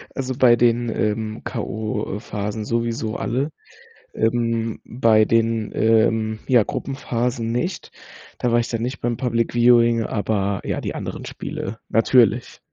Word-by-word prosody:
also, 130 Hz, -1 st, -3 dB
bei 125 Hz, -3 st, +6 dB
den, 120 Hz, 0 st, +2 dB
ähm, 110 Hz, 0 st, -2 dB
K.O.-Phasen 105 Hz, -2 st, -4 dB
sowieso 115 Hz, -1 st, -2 dB
alle. 135 Hz, +6 st, -1 dB, 0.6 s
Ähm, 115 Hz, -1 st, 0 dB
bei 115 Hz, -3 st, +3 dB
den, 115 Hz, -1 st, +1 dB
ähm, 110 Hz, -1 st, +2 dB
ja 125 Hz, -4 st, +5 dB
Gruppenphasen, 120 Hz, -2 st, -3 dB
nicht, 125 Hz, +11 st, -3 dB, 0.5 s
da 120 Hz, -, 0 dB
war 120 Hz, -, +4 dB
ich 115 Hz, -, -1 dB
dann 115 Hz, -2 st, -2 dB
nicht 125 Hz, +3 st, -3 dB
beim 120 Hz, -1 st, -1 dB
Public 115 Hz, -2 st, -1 dB
Viewing, 120 Hz, -1 st, +5 dB
aber 100 Hz, -2 st, -1 dB
ja, -, -, -2 dB
die -, -, -4 dB
anderen -, -, -6 dB
Spiele 110 Hz, +4 st, -6 dB
natürlich. 115 Hz, -1 st, +3 dB
115 Hz, 130 wpm, -22 LUFS, 110-120 Hz, 0.6 s, bei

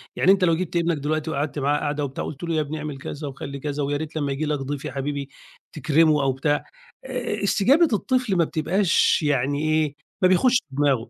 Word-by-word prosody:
يعني 190 Hz, -, +4 dB
أنت 195 Hz, -1 st, +3 dB
لو 165 Hz, -2 st, +4 dB
جبت 180 Hz, 0 st, -4 dB
ابنك 170 Hz, -2 st, +1 dB
دلوقتي 155 Hz, +2 st, -2 dB
وقعدت 145 Hz, +1 st, -2 dB
معاه 145 Hz, +2 st, +1 dB
قعدة 145 Hz, 0 st, -2 dB
وبتاع 135 Hz, -, -5 dB
وقلت 150 Hz, +3 st, -7 dB
له 165 Hz, -1 st, -1 dB
يا 155 Hz, -, +2 dB
ابني 150 Hz, +1 st, -4 dB
اعمل 150 Hz, -2 st, -5 dB
كذا، 145 Hz, +2 st, -6 dB
وخلّي 140 Hz, 0 st, -7 dB
كذا، 145 Hz, +1 st, -3 dB
ويا 145 Hz, +1 st, -1 dB
ريت 160 Hz, +1 st, -6 dB
لمّا 145 Hz, -3 st, -1 dB
ييجي 140 Hz, +3 st, -2 dB
لك 150 Hz, -1 st, -1 dB
ضيف 140 Hz, +2 st, -5 dB
يا 145 Hz, -, -4 dB
حبيبي 140 Hz, 0 st, -4 dB, 0.5 s
تكرمه 155 Hz, +1 st, +3 dB
أو 135 Hz, -1 st, +2 dB
بتاع، 145 Hz, +3 st, 0 dB, 0.4 s
آآ، 250 Hz, -5 st, -3 dB
استجابة 260 Hz, -, +4 dB
الطفل 250 Hz, -2 st, 0 dB
ما 170 Hz, -, +4 dB
بتبقاش 170 Hz, +4 st, +2 dB
يعني 140 Hz, 0 st, +1 dB
إيه، 155 Hz, -2 st, +1 dB, 0.3 s
ما -, -, +8 dB
بيخشش 240 Hz, +7 st, +4 dB
دماغه 135 Hz, -4 st, +1 dB
150 Hz, 210 wpm, -23 LUFS, 140-170 Hz, 0.5 s, ما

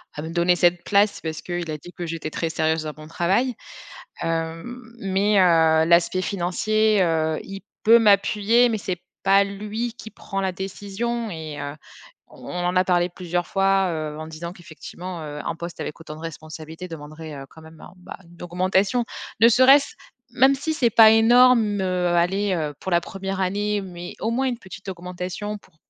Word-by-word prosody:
à 150 Hz, -, -5 dB
me 160 Hz, -, -6 dB
donner 175 Hz, +1 st, +3 dB
cette 175 Hz, 0 st, +2 dB
place, 205 Hz, 0 st, +2 dB
parce 160 Hz, -1 st, -5 dB
qu'il 175 Hz, -2 st, -4 dB
a 155 Hz, -, -3 dB
dit 175 Hz, +4 st, -13 dB
que 175 Hz, -1 st, -5 dB
j'étais 160 Hz, -1 st, -5 dB
très 165 Hz, -, -2 dB
sérieuse 160 Hz, 0 st, 0 dB
dans 155 Hz, -1 st, -5 dB
mon 155 Hz, 0 st, -11 dB
travail. 190 Hz, +10 st, 0 dB, 0.7 s
Hem, 165 Hz, +9 st, -3 dB, 0.2 s
mais, 195 Hz, +1 st, +2 dB
heu, 160 Hz, -3 st, +4 dB
l'aspect 175 Hz, +2 st, +3 dB
financier, 205 Hz, +3 st, +1 dB
heu, 160 Hz, -2 st, +1 dB
il 195 Hz, 0 st, -8 dB, 0.2 s
peut 230 Hz, +2 st, +7 dB
m'appuyer, 215 Hz, +3 st, +4 dB
mais 220 Hz, -, -1 dB
c'est 180 Hz, -3 st, -4 dB, 0.2 s
pas 195 Hz, +1 st, +5 dB
lui 210 Hz, +4 st, -4 dB
qui 220 Hz, -3 st, -11 dB
prend 195 Hz, -2 st, -6 dB
la 190 Hz, -1 st, 0 dB
décision, 205 Hz, +4 st, -4 dB
et 155 Hz, -3 st, -7 dB
heu, 145 Hz, 0 st, -5 dB, 0.5 s
on -, -, -12 dB, 0.2 s
en 180 Hz, +1 st, 0 dB
a 185 Hz, -, +4 dB
parlé 175 Hz, -1 st, +1 dB
plusieurs 175 Hz, 0 st, -3 dB
fois, 195 Hz, -1 st, +2 dB
heu, 155 Hz, -1 st, -4 dB
en 155 Hz, -, -6 dB
disant 165 Hz, +2 st, -7 dB
qu'effectivement, 175 Hz, 0 st, -9 dB
heu, 150 Hz, 0 st, -7 dB
un -, -, -2 dB
poste 170 Hz, 0 st, -8 dB
avec 150 Hz, -, -6 dB
autant 155 Hz, -1 st, -9 dB
de 155 Hz, -, -12 dB
responsabilités 160 Hz, +1 st, -8 dB
demanderait, 155 Hz, -1 st, -9 dB
heu, 135 Hz, 0 st, -8 dB
quand 160 Hz, -, -15 dB
même 160 Hz, 0 st, -15 dB
un -, -, -13 dB
bah, 180 Hz, -, -10 dB
une 170 Hz, 0 st, -17 dB
augmentation. 190 Hz, +6 st, +1 dB, 0.3 s
Ne 230 Hz, +1 st, +7 dB
serait-ce 270 Hz, +4 st, +5 dB, 0.4 s
même 265 Hz, +3 st, +5 dB
si 310 Hz, +3 st, -2 dB
c'est 235 Hz, -5 st, +2 dB
pas 220 Hz, 0 st, +8 dB
énorme, 225 Hz, -2 st, +5 dB
heu, 180 Hz, -1 st, 0 dB
allez, 185 Hz, +3 st, +1 dB
heu, 155 Hz, -4 st, -2 dB
pour 190 Hz, -, -5 dB
la 170 Hz, 0 st, +3 dB
1re 195 Hz, +1 st, -5 dB
année, 205 Hz, +2 st, 0 dB
mais 175 Hz, -2 st, -8 dB
au 225 Hz, -, -1 dB
moins, 265 Hz, +3 st, 0 dB
une 245 Hz, -2 st, -2 dB
petite 190 Hz, 0 st, -12 dB
augmentation 180 Hz, +3 st, -5 dB
pour 160 Hz, -, -25 dB
180 Hz, 190 wpm, -23 LUFS, 165-205 Hz, 0.7 s, pas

